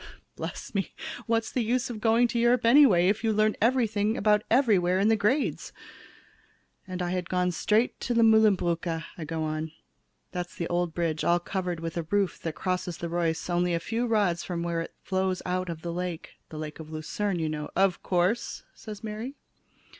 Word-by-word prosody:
Bless - - -6
me, - - -2 0.3
what's 225 -1 0
the 250 - 0
use 245 +2 0
of 215 -3 -7
going 230 +2 +4
to 235 - -1
Europe 240 0 +3
anyway, 230 -9 +6
if 205 +4 +1
you 225 - +2
learn 215 0 +2
everything 220 -3 +2
about 210 0 +3
everywhere 200 -8 +3
in 205 +3 +3
the 225 - +5
grades? 220 +8 0 1.2
"And 185 -1 -4
had 180 0 -2
gone 180 0 +1
straight 215 +7 +1
to 240 - -2
the 230 - +5
Mühlenbrücke," 180 -7 +3
I 165 - -6
go 160 +1 -3
on, 155 0 -3 0.6
"that's 180 -1 -5
the 170 - -3
old 175 -1 -1
bridge 165 -3 -1
all 175 0 +3
covered 180 -1 -3
with 165 +1 -5
a 170 - -1
roof 200 -1 +1
that 160 -2 -4
crosses 180 -2 -2
the 170 - -4
Reuss 165 -1 -1
only 175 0 +1
a - - 0
few 230 +7 -2
rods 200 -6 +1
from 170 -2 -3
where 170 -1 -1
it - - -8
flows 190 -1 -1
out 185 0 -1
of 160 -1 -6
the 170 -1 -3
lake; 175 -2 -4 0.2
the 155 - -8
lake 155 0 -6
of 155 -1 -9
Lucerne, 175 +5 -2
you 160 -2 -1
know." 150 -1 -4
"Of 190 -1 +2
course," 185 +6 0
said 215 -1 -9
Mary. 220 +5 -5
185 Hz, 190 wpm, -27 LUFS, 170-220 Hz, 1.2 s, anyway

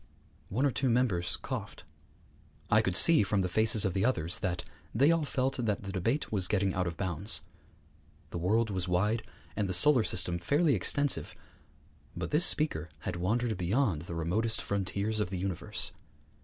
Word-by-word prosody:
One 125 +8 0
or 140 - +2
two 135 +1 -1
members 115 -8 +1
coughed. - - -6 0.9
I - - +5
could 90 - -1
see 165 - +7
from 100 -1 0
the 90 - 0
faces 110 +2 +3
of 95 - 0
the 95 - 0
others 85 -9 +1
that 90 -2 -2 0.3
they 140 +7 +4
all 165 -2 +1
felt 135 0 -1
that 110 -5 -2
the 100 - -6
debate 115 - -1
was 95 -4 +1
getting 100 -2 0
out 90 -1 -1
of 85 - -5
bounds. 95 +2 +1 0.9
The 85 - -4
world 110 +5 +1
was 95 -1 -3
wide, 105 +6 +1 0.3
and 105 -3 -1
the 95 - +1
solar 125 +5 +5
system 90 -3 -1
fairly 145 - +2
extensive; 120 - 0 0.8
but - - -4
this 155 +4 +3
speaker 85 - 0
had - - -4
wandered 110 +6 -1
beyond 95 - 0
the 85 0 -7
remotest 105 +8 0
frontiers 100 +2 -2
of 105 - -1
the 95 - -4
universe. 95 -1 -3
100 Hz, 175 wpm, -30 LUFS, 90-120 Hz, 0.9 s, see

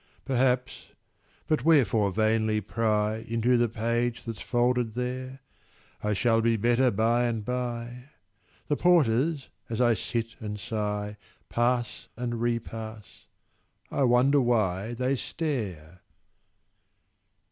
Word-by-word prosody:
Perhaps—but 130 +3 -2
wherefore 120 -10 +4
vainly 110 +1 +1
pry 105 0 0
Into 115 +2 0
the 120 -1 +2
page 115 +2 -1
that's 115 -3 -6
folded 120 -2 +1
there? 130 +2 -4 0.6
I 105 0 +1
shall 115 +2 +2
be 115 0 +2
better 120 +4 +3
by 115 +3 +2
and 115 -3 -2
by: 125 0 -4 0.6
The 145 - 0
porters, 150 -3 +2 0.2
as 115 - -3
I 120 -2 +4
sit 115 +2 -3
and 105 -2 -5
sigh, 105 -1 -3 0.3
Pass 120 0 0
and 120 -1 -3
repass—I 110 - -6
wonder 130 +4 +4
why 110 -2 0
They 130 +3 0
stare! 95 - -4
120 Hz, 105 wpm, -27 LUFS, 110-125 Hz, 0.6 s, wherefore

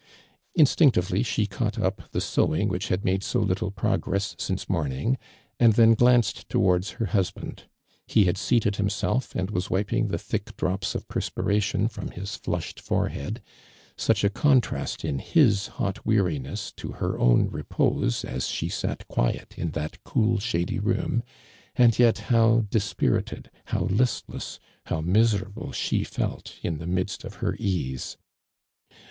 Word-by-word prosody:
Instinctively 130 - +4
she 110 -3 0
caught 100 - -2
up - - -2
the - - -2
sewing 80 - +1
which 95 +5 -2
had 95 +1 -1
made 95 +1 +1
so 125 - -1
little 95 -3 0
progress 100 0 -1
since 95 0 -3
morning, 80 - 0 0.4
and 115 -2 +6
then 115 +1 +6
glanced 120 0 +3
towards 90 0 +2
her 115 - 0
husband. 95 -1 -2 0.4
He 105 - +4
had 90 - +2
seated 105 -1 +1
himself, 105 +5 -1
and 95 +2 -1
was 90 -3 -1
wipmg 105 +5 +1
the - - -1
thick - - -4
drops 95 +1 -1
of - - -4
perspiration 105 +1 0
from 115 - -6
his 95 +3 -6
flushed - - -4
forehead, - - -2 0.5
such - - +1
a 100 - +3
contrast 130 +2 +1
in 70 - -1
his 110 - +3
hot 100 0 -3
weariness 90 - 0
to - - -6
her - - -2
own - - +4
repose - - 0
as 65 0 -3
she - - -2
sat - - -3
quiet - - -1
in 85 - -2
that 80 -1 -5
cool 110 0 +1
shady 85 -5 -1
room, 120 - 0 0.5
and 120 -2 +5
yet 120 -2 +5
how 115 -2 +3
dispirited, 105 -3 -1
how - - -1
listless, 120 +5 -1 0.3
how 80 - -1
mis 105 +7 +3
erable 100 0 -5
she - - 0
felt - - -4
in 80 -3 -2
the 80 - -6
midst 90 +3 -2
of 95 - -9
lier 100 -3 +1
easi 85 - -2
100 Hz, 150 wpm, -26 LUFS, 90-115 Hz, 0.5 s, and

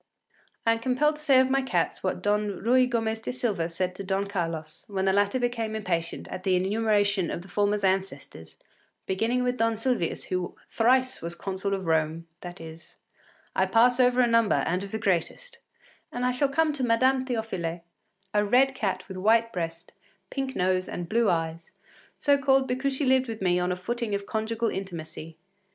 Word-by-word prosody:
I 230 - +5
am 230 - +1
compelled 260 +6 +1
to - - -13
say 275 -4 +5
of 260 0 +3
my 270 0 +3
cats 265 - -1
what - - -2
Don 205 -1 0
Ruy 255 +2 +4
Gomez 225 -2 -1
de 225 - -4
Silva 210 -10 -1
said 180 +2 -2
to 195 - -7
Don 195 +1 -1
Carlos, 165 -5 -4
when 195 -2 -2
the 190 - +3
latter 205 +4 +2
became 235 -3 -2
impatient 170 -5 -3
at 185 - -6
the 185 -1 +2
enumeration 200 -1 +1
of 170 - -4
the - - -13
former’s 205 +1 0
ancestors, 190 - -2 0.5
beginning 225 +6 0
with 250 0 0
Don 225 -1 +1
Silvius 225 -6 -1
“who 180 -1 -3 0.2
thrice 255 +3 +2
was 170 +1 -4
Consul 195 +2 -3
of 190 -1 -6
Rome,” 160 0 0
that 175 +1 -9
is, 160 0 -11 0.6
“I - - +2
pass 245 +2 +4
over 250 0 +4
a - - +5
number, 230 -2 +3
and 180 +3 -1
of 200 - -8
the 220 - -2
greatest,” 220 - -2 0.5
and 245 +1 -2
I 250 - +2
shall 270 +3 +1
come 310 +2 +2
to 275 -3 -2
Madame 255 +3 +3
Théophile, 205 -9 -3 0.5
a 210 0 +3
red 255 +6 +4
cat 210 -7 -2
with 190 - -7
white 225 +4 +3
breast, 165 -1 -5 0.4
pink 270 -1 -3
nose, 185 0 +1
and 175 -1 -5
blue 230 +2 +2
eyes, 165 -1 -2 0.5
so 285 -1 +3
called 270 -1 +3
because 265 +2 -1
she 285 - 0
lived 260 0 +3
with 225 -1 -5
me 180 -2 +2
on 180 0 0
a - - 0
footing 220 +3 -3
of 200 0 -4
conjugal 225 +1 -1
intimacy. 165 -4 -7
210 Hz, 190 wpm, -27 LUFS, 185-250 Hz, 0.6 s, I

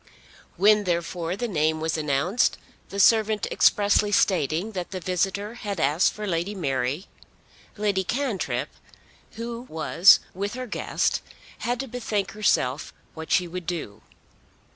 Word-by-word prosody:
When 210 +2 +5
therefore 170 0 -2
the 240 +4 -3
name 155 -5 0
was 160 -1 -1
announced, 155 - +1 0.3
the 200 - -5
servant 215 0 +4
expressly 205 0 +3
stating 180 0 +1
that 180 -4 -5
the 185 - -5
visitor 195 +4 -1
had 205 -6 -5
asked 155 +4 +2
for 210 - -6
Lady 180 +2 -2
Mary, 135 -1 -2 0.7
Lady 205 -2 0
Cantrip, 185 - -2 0.6
who 230 +1 -5
was 165 +3 +5
with 200 +4 -4
her 255 0 -4
guest, 235 - -1 0.4
had 245 0 -2
to 270 - -6
bethink 220 -5 -2
herself 150 -10 0 0.2
what 160 0 -8
she 180 - +3
would 180 0 -7
do. 160 - -5
190 Hz, 135 wpm, -25 LUFS, 160-210 Hz, 0.7 s, When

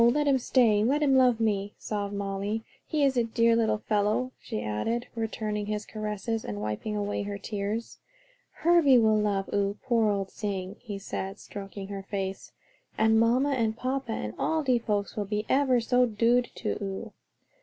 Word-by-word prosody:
let 295 +4 +1
him 270 -2 +4
stay; 230 -4 +3
let 285 +6 +2
him 275 -2 +4
love 250 -3 +5
me," 205 -2 0
sobbed 205 -2 -3
Molly. 200 +2 -2 0.2
"He 305 -2 +1
is 270 -1 +3
a 240 - +4
dear 230 0 +3
little 220 -2 +2
fellow," 210 +4 0
she 220 -3 -5
added, 225 - -1
returning 215 -2 -3
his 210 0 -2
caresses, 215 +1 -3
and 105 0 -5
wiping 105 - -3
away 205 0 -1
her 205 0 -4
tears. 210 +2 -4 0.5
"Herbie 330 -6 +4
will 220 -2 +4
love 200 -2 0
oo, 200 0 0
poor 230 -4 +2
old 195 -2 -1
sing," 195 -2 -4
he 210 -5 -6
said, 195 0 -5
stroking 195 -1 -8
her 200 -1 -5
face, 195 -1 -4 0.5
"and 220 0 +4
mamma 250 +5 +3
and 225 -4 0
papa, 255 -2 -2
and 105 - -4
all 320 -1 +1
de 255 -3 +3
folks 205 -3 -2
will 210 - -2
be 210 +1 -2
ever 265 -2 +3
so 250 +1 +3
dood 235 +3 +2
to - - -3
oo." 195 -1 -5
215 Hz, 175 wpm, -28 LUFS, 200-240 Hz, 0.5 s, love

